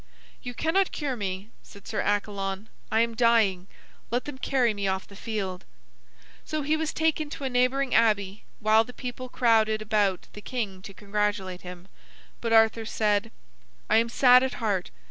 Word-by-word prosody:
"You 245 -1 -7
cannot 360 +7 +1
cure 285 -4 -3
me," 195 -1 -5
said 200 -2 -15
Sir 230 - -1
Accalon. 200 0 -2 0.2
"I 220 - +3
am 235 0 0
dying. 220 -6 +3 0.4
Let 245 +2 -1
them 290 -3 -7
carry 255 -4 +1
me 200 -1 -2
off 190 0 -2
the 200 - -14
field." 195 -4 -4 0.8
So 310 -1 -3
he 300 +3 +1
was 315 0 -2
taken 315 -1 0
to 285 - -7
a 265 - -1
neighboring 255 +2 +1
abbey, 205 -3 +2 0.2
while 215 +1 +4
the 250 - -12
people 250 +1 -6
crowded 220 -3 +3
about 210 -3 0
the 205 - -9
king 205 -6 -4
to 195 0 -11
congratulate 200 -2 -2
him, 180 0 -10 0.5
but 230 - -2
Arthur 225 0 +4
said: 210 -2 0 0.6
"I - - +6
am 230 +1 +2
sad 250 +1 +6
at 265 0 -1
heart. 205 -6 -1
220 Hz, 170 wpm, -26 LUFS, 200-250 Hz, 0.8 s, I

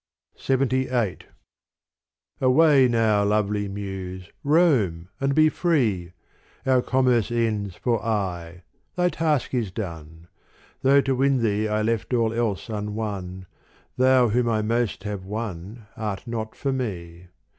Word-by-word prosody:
LXXVIII 130 -5 0 1.2
Away 135 0 +5
now, 110 -3 +2
lovely 105 0 0
Muse, 95 -2 -6
roam 130 - +2
and 135 0 0
be 155 0 +6
free: 115 - 0 0.5
Our 130 -1 +3
commerce 125 -4 +2
ends 110 -5 -1
for 115 -4 -1
aye, 90 -5 -3 0.3
thy 180 -1 +2
task 155 -5 -1
is 120 -6 0
done: 80 -4 -7 0.5
Though 140 +1 +5
to 135 -1 0
win 135 -1 +2
thee 105 0 +1
I 105 0 0
left 115 +2 -1
all 115 -1 +1
else 115 -6 -1
unwon, 105 -4 -4 0.5
Thou 130 -1 +4
whom 120 +2 +1
I 110 -1 +1
most 110 -3 -1
have 105 -2 -5
won 105 +1 -6
art 105 -3 -4
not 110 -2 -5
for 135 -1 -2
me. 90 -8 -5
110 Hz, 125 wpm, -24 LUFS, 100-130 Hz, 1.2 s, be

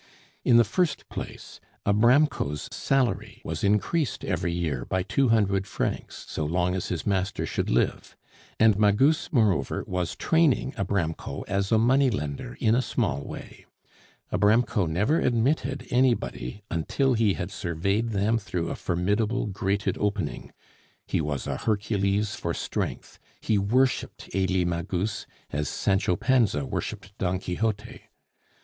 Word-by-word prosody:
In 120 - +5
the 120 - +7
first 160 - -1
place, - - -7 0.3
Abramko's 110 - +3
salary 130 -7 0
was 80 -1 -4
increased 105 +8 +1
every 85 - -1
year 80 -8 -2
by 95 +6 -1
two 120 +6 +1
hundred 100 -4 +2
francs - - -3
so 80 - -3
long 90 +4 +1
as 95 - -2
his 85 - -3
master 100 0 0
should - - -2
live; - - 0 0.4
and 110 -2 +5
Magus, 115 +10 +3
moreover, 100 - +2
was 90 -1 -2
training 160 -5 +2
Abramko 95 -7 -2
as 100 0 -1
a 110 - +5
money 130 +4 +4
lender 100 - -4
in 110 -2 +3
a 125 - +3
small 70 - -1
way. - - -10 0.7
Abramko 105 -2 +3
never 105 - +1
admitted 135 +3 0
anybody 105 - 0
until 130 - +1
he 110 -4 +2
had 95 +1 -4
surveyed 100 +5 -1
them 110 +2 +1
through 90 -4 -3
a - - -3
formidable 105 +7 0
grated 100 -1 -1
opening. 105 0 -2 0.5
He - - 0
was 75 -3 -3
a - - -2
Hercules 105 -1 0
for 85 -1 -3
strength, - - -4 0.2
he 110 -2 +1
worshiped 125 +7 0
Elie 95 -1 +1
Magus, 85 +4 -2 0.2
as 75 +1 -1
Sancho 95 -2 +1
Panza 110 - +2
worshiped 95 +8 -5
Don 90 -1 0
Quixote. 105 +4 -3
100 Hz, 135 wpm, -26 LUFS, 90-115 Hz, 0.7 s, the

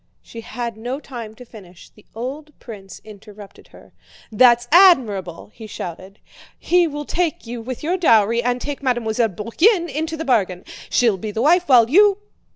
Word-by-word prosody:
She 230 - -11
had 235 -1 -6
no 245 +5 -5
time 235 -7 -9
to 250 - -13
finish. 185 -7 -16
The 210 - -23
old 280 +6 -7
prince 195 -5 -12
interrupted 210 -1 -14
her. - - -19 0.4
"That's 240 +2 +4
admirable!" 225 - +3
he 220 -2 -11
shouted. 185 0 -9 0.4
"He 355 -1 +2
will 295 -1 -6
take 345 -1 -2
you 235 0 -7
with 250 +3 -8
your 350 +4 -1
dowry 230 - +3
and 245 +1 -1
take 290 +2 -6
Mademoiselle 240 -3 -1
Bourienne 335 - +1
into 320 +3 -4
the 320 - -5
bargain. 190 -9 -1 0.2
She'll 230 -5 +2
be 215 +4 -6
the 220 +3 -3
wife, 350 +3 +2
while 240 -4 +6
you..." 400 - +4
240 Hz, 165 wpm, -20 LUFS, 215-300 Hz, 0.4 s, while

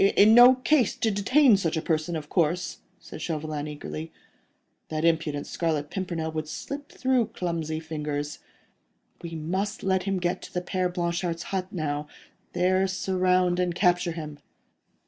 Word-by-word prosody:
"In 215 +2 +7
no 245 +2 +9
case 255 -1 +2
to 220 - 0
detain 230 +4 +4
such 165 -4 -1
a - - 0
person, 160 +1 0
of 155 -2 -5
course," 170 +2 0 0.2
said - - -10
Chauvelin, 155 -2 -3
eagerly. 155 +2 -6 0.8
"That 155 +1 -1
impudent 160 -3 +1
Scarlet 155 -3 -2
Pimpernel 170 -4 -3
would 155 -1 -4
slip 285 - -6
through 255 -4 +1
clumsy 165 -3 -3
fingers. 150 -2 -4 0.8
We 165 -1 -6
must 190 +7 -3
let 190 -1 +2
him 195 - 0
get 180 +1 -1
to - - -11
the 180 - 0
Père 185 0 -1
Blanchard's 170 -1 -2
hut 185 -1 -1
now; 150 -4 -3 0.5
there 185 +2 +2
surround 185 -1 +1
and 180 -1 0
capture 180 -2 +2
him." 150 -3 -7
175 Hz, 150 wpm, -26 LUFS, 155-190 Hz, 0.8 s, no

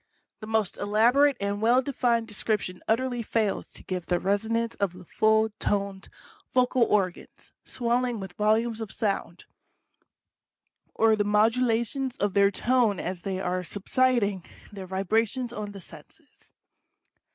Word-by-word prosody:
The 215 - -9
most 220 -3 0
elaborate 240 +7 +3
and 200 +1 -2
well 245 +4 +4
defined 240 -4 0
description 210 -3 -2
utterly 245 +1 0
fails 220 -2 -1
to - - -7
give 180 -2 -5
the 175 -1 +1
resonance 225 +4 0
of 200 -3 -2
the 180 0 -13
full 220 +3 +2
toned 200 -1 -2 0.4
vocal 255 0 +2
organs, 190 -5 -2
swelling 245 -1 -1
with 190 -2 -7
volumes 220 +3 +1
of 220 - -5
sound, 195 -5 -3 1.5
or 220 0 +4
the 210 - +1
mod 210 +2 +3
ulations 250 +2 -1
of 205 -1 0
their 200 0 +5
tone 230 -1 +1
as 180 -1 -4
they 190 0 -3
are 180 -1 -2
subsiding 205 0 0 0.3
their 195 -2 -8
vibrations 220 +6 -1
on 210 -2 -5
the 200 -1 -10
senses. - - -14
215 Hz, 140 wpm, -26 LUFS, 195-235 Hz, 1.5 s, their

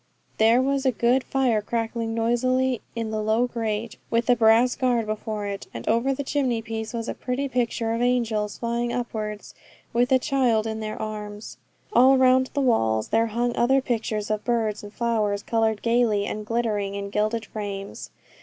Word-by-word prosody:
There 230 +3 +5
was 275 0 0
a 260 - +3
good 245 +2 +2
fire 250 -5 +1
crackling 225 +1 -2
noisily 250 +2 +1
in 225 -1 -3
the 215 0 -1
low 220 +3 +2
grate, 225 -2 -3
with 230 +1 +2
a - - +5
brass 230 +2 +4
guard 245 -3 +1
before 215 -1 -4
it, 200 -1 -5
and 115 - -7
over 235 +4 +2
the 275 +1 -2
chimney 260 -5 0
piece 220 -1 -5
was 235 -1 -4
a - - -2
pretty 265 +2 -3
picture 235 -3 -1
of 230 - -2
angels 230 -4 0
flying 235 0 -1
upwards 215 -4 -4 0.4
with 245 +2 +2
a 260 - +7
child 250 -5 +1
in 220 0 -3
their 215 0 -5
arms. 210 -1 -6 0.4
All 265 +2 +6
round 260 0 +4
the 285 - +1
walls 110 - +1
there 225 +1 +2
hung 235 +2 -1
other 265 +3 +3
pictures 220 -4 -2
of 215 -1 -1
birds 225 -3 0
and 205 - -10
flowers, 215 -3 -1
coloured 225 -2 0
gaily, 230 -3 +2
and 210 +1 -5
glittering 215 -4 -1
in 200 0 -5
gilded 215 +2 0
frames. 200 -2 -6
230 Hz, 180 wpm, -24 LUFS, 215-245 Hz, 0.4 s, a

